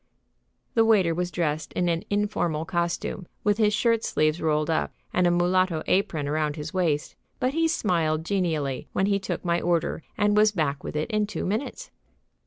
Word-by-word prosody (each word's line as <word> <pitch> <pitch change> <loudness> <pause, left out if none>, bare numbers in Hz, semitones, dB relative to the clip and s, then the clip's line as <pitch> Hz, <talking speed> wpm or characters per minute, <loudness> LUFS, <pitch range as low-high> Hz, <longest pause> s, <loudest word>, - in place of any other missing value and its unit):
The 225 - +4
waiter 200 -7 +4
was 175 +1 -2
dressed 155 -2 -2
in 175 - 0
an 165 -1 0
informal 205 -6 0
costume, 175 +1 -2 0.2
with 210 +1 +2
his 210 -1 +4
shirt 230 +1 +2
sleeves 155 +2 +1
rolled 155 0 +1
up 160 - -1 0.2
and 180 0 +3
a - - +4
mulatto 175 -1 +2
apron 185 -7 +1
about 150 0 0
his 150 0 -6
waist, 165 -6 0 0.2
but 255 +2 0
he 325 +1 +2
smiled 165 - 0
genially 160 -9 -1
when 190 - +2
he 200 0 +2
took 190 - -4
my 170 0 +1
order 170 -2 0 0.2
and 205 0 +3
was 210 0 +5
back 150 -6 -1
with - - -6
it 155 +9 -2
in 215 -1 +1
two - - -4
minutes. 240 - -3
175 Hz, 185 wpm, -26 LUFS, 155-205 Hz, 0.2 s, was